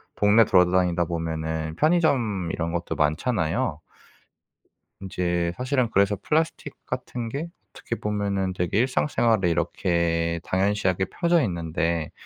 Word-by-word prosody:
동네 105 +2 +5
돌아다니다 90 -2 +3
보면은 80 -1 -3
편의점 130 - +2
이런 85 0 -2
것도 85 0 -3
많잖아요. 80 - 0 1.2
인제 85 -2 -1
사실은 130 -1 0
그래서 100 +1 +2
플라스틱 160 +1 -1
같은 120 -2 -4
게 145 +8 -4 0.2
어떻게 - - -5
보면은 100 -3 -2
되게 90 +2 0
일상생활에 115 - +2
이렇게 85 0 0
당연시하게 95 -1 +1
퍼져 170 -1 +1
있는데 85 -3 -2
95 Hz, 305 characters per minute, -25 LUFS, 85-115 Hz, 1.2 s, 동네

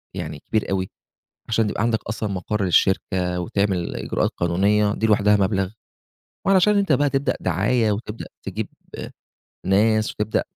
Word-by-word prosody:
يعني 75 - -5
كبير 110 -1 0
أوي، 95 -1 -1 0.6
عشان 110 -1 +2
تبقى 105 - -2
عندك 115 -2 +1
أصلًا 110 0 -2
مَقَر 100 +3 -2
للشركة 90 0 +1
وتعمل 95 0 -1
إجراءات - - -1
قانونية، 100 +4 +2
دي 110 - 0
لوحدها 105 -1 +4
مبلغ 95 -1 +1 0.8
وعلشان 195 +2 +4
أنت 195 -5 +1
بقى 145 +1 +3
تبدأ 135 0 0
دعاية 105 +6 +1
وتبدأ 105 +1 -5 0.2
تجيب 100 +2 -4 1.0
ناس 110 +3 +3
وتبدأ 105 0 -1
105 Hz, 135 wpm, -22 LUFS, 95-110 Hz, 1.0 s, لوحدها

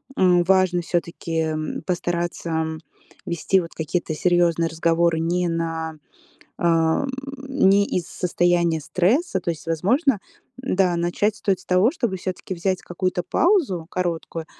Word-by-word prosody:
м, 180 -5 +4
важно 185 -1 +3
всё-таки, 170 -1 -3 0.2
м, 155 0 -4
постараться, 175 -1 -2
м, 160 0 -1 0.5
вести 170 +3 +1
вот 170 -2 -6
какие-то 160 +1 -2
серьёзные 170 0 +2
разговоры 165 0 +1
не 175 +2 0
на, 165 -1 -2 0.6
эм, 165 +9 +2 0.4
не 200 -8 +4
из 180 -3 -2
состояния 175 -2 +1
стресса. 190 - +1
То 175 - -4
есть, 155 -3 -9
возможно, 215 - +2 0.4
м, 260 - -1
да, 180 -2 +3
начать 175 +5 0
стоит 195 -4 0
с 185 - -17
того, 185 +5 +4
чтобы 235 - -2
всё-таки 185 +1 -5
взять 185 +2 -1
какую-то 180 0 -2
паузу 225 - +1
короткую 170 -3 -3
175 Hz, 135 wpm, -23 LUFS, 165-190 Hz, 0.6 s, м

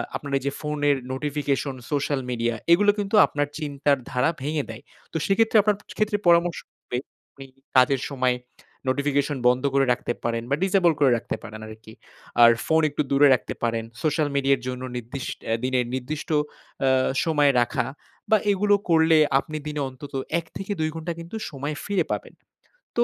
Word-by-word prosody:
আপনার 140 -1 -5
এই 135 - -5
যে 140 - 0
ফোনের 145 -2 +1 0.2
নোটিফিকেশন, 140 -1 -2 0.2
সোশ্যাল 145 -1 0
মিডিয়া, 120 -1 -1 0.2
এগুলো 205 +3 +5
কিন্তু 205 +1 -1
আপনার 145 0 -2
চিন্তার 145 -2 0
ধারা 125 +5 +2
ভেঙে 150 +1 -1
দেয়। - - -8 0.3
তো - - -2
সেক্ষেত্রে 225 +2 +3
আপনার 210 0 +2 0.2
ক্ষেত্রে 215 -1 +1
পরামর্শ 170 0 +4 0.2
হবে 125 - -5 0.3
আপনি 135 -1 -12 0.3
কাজের 130 +1 +4
সময় 130 -2 +1 0.5
নোটিফিকেশন 140 +1 0
বন্ধ 125 +1 +3
করে 135 -1 +4
রাখতে 120 - -3
পারেন 115 0 -1
বা 140 - +3
ডিসেবল 190 -3 +4
করে 135 -3 +5
রাখতে - - -4
পারেন 110 0 -8
আরকি। 110 0 -12 0.5
আর 115 - +9
ফোন 160 0 +3
একটু 145 - -2
দূরে 145 +1 +6
রাখতে 125 - -1
পারেন। 115 -1 0 0.2
সোশ্যাল 155 0 +1
মিডিয়ার 135 -2 +2
জন্য 125 0 -4
নির্দিষ 120 +3 -6 0.3
এ - - +3
দিনে 130 0 +1 0.2
নির্দিষ্ট 150 +6 -5 0.6
আ - - +5 0.4
সময় 150 -3 +4
রাখা 125 0 0 0.4
বা 215 - +6
এগুলো 205 +1 +3
করলে 160 -1 +5 0.2
আপনি 155 +2 -6
দিনে 150 -1 -3
অন্তত 130 +2 -11 0.3
১-২ 165 0 -4
ঘন্টা 165 +1 -4
কিন্তু 170 +6 -8
সময় 145 +1 -4
ফিরে 205 -1 0
পাবেন। - - -4 0.6
তো 240 - +5
145 Hz, 165 wpm, -24 LUFS, 130-160 Hz, 0.6 s, আর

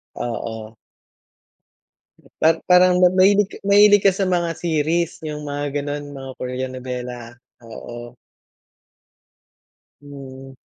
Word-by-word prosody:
Oo. 110 -2 -6 1.7
At 165 +1 +4
parang 180 0 +5
ma 180 - +6
mahilig 200 +2 +4
ka - - -12
mahilig 205 0 +5
ka 195 - +6
sa 195 +1 -2
mga 175 -2 0
series, 165 +1 -1
yung 150 -1 -6
mga 145 0 -3
gano'n? 145 0 -4
Mga 135 -1 -8
Korean 125 +1 -5
nobela? 125 -2 -7 0.3
Oo. 120 +1 -10 1.9
Hmm, 135 -1 -11
145 Hz, 105 wpm, -21 LUFS, 125-180 Hz, 1.9 s, ma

